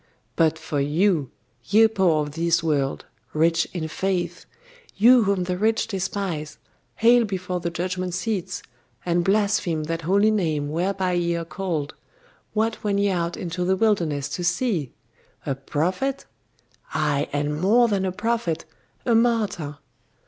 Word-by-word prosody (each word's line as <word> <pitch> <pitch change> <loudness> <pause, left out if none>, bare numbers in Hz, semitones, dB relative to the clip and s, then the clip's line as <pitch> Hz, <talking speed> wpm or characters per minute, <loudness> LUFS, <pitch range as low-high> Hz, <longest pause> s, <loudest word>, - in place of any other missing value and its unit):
But 160 -1 +3
for 160 -2 -3
you, 155 - +1 0.4
ye 220 +3 +5
poor 185 -8 +2
of 145 - -6
this 165 +1 +1
world, 140 -4 0 0.3
rich 165 +2 +2
in 165 -3 -3
faith, 175 0 -2 0.5
you 235 +2 +6
whom 195 -2 +1
the 180 0 -3
rich 220 +2 +2
despise, 190 -5 -3 0.4
hale 235 +1 +5
before 185 -3 -3
the 170 0 -2
judgment 180 +1 -3
seats, 195 -1 -3 0.4
and 175 0 +1
blaspheme 195 -5 +1
that 165 +2 -3
holy 200 +6 +3
name 155 -8 0
whereby 185 +3 0
ye 170 -1 0
are 170 0 -3
called 160 -3 -3 0.6
what 220 +1 -1
went 205 -2 +1
ye 200 0 +2
out 170 -2 -1
into 180 0 -3
the 190 +1 +2
wilderness 170 -10 +1
to 180 - -4
see? 180 - 0 0.5
A 135 - 0
prophet? 180 - -2 0.7
Ay, 150 -2 +1
and 145 +1 -1
more 235 +6 +5
than 200 -3 0
a 190 - 0
prophet 205 -5 -1 0.4
a 240 - +3
martyr! 220 -11 +1
180 Hz, 145 wpm, -24 LUFS, 160-200 Hz, 0.7 s, you